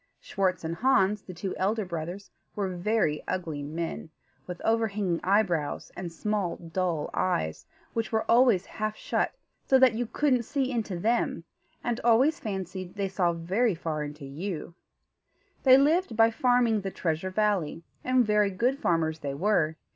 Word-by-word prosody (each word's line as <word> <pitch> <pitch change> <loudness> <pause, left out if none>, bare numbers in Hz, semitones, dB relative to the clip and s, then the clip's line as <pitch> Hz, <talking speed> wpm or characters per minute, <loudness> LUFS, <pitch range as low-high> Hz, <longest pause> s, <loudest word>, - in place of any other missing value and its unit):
Schwartz 185 -3 -1
and 165 +1 -3
Hans, 210 -5 +3
the 185 - -10
two 185 +2 -4
elder 210 +2 0
brothers, 175 +3 -6 0.2
were 195 -3 -2
very 175 -4 +1
ugly 165 -6 -3
men, 160 +2 -4 0.4
with 180 -1 -6
overhanging 210 -6 +1
eyebrows 180 -7 +1
and 175 -1 -5
small, 200 +1 -1
dull 170 -2 -2
eyes, 80 - -1 0.3
which 225 -1 -2
were 220 -1 0
always 230 -6 +4
half 215 0 -3
shut, - - -1 0.3
so 265 - +4
that 260 -3 +6
you 235 +1 -2
couldn't 260 -1 +2
see 270 +2 -1
into 220 -7 -2
them, 230 +7 0 0.4
and 240 -1 -1
always 245 +7 +4
fancied 190 -3 -5
they 200 -1 -1
saw 185 -2 +1
very 185 +6 0
far 160 -2 -3
into 145 -1 -7
you. 165 +4 -5 0.9
They 260 -1 +7
lived 300 -2 +2
by 225 0 +6
farming 240 -2 +2
the 195 - -3
Treasure 170 0 -2
Valley, 185 -5 0 0.2
and 255 -1 +3
very 210 -1 +3
good 245 +8 0
farmers 160 - 0
they 140 -3 -4
were. 160 -2 +1
195 Hz, 155 wpm, -28 LUFS, 170-225 Hz, 0.9 s, They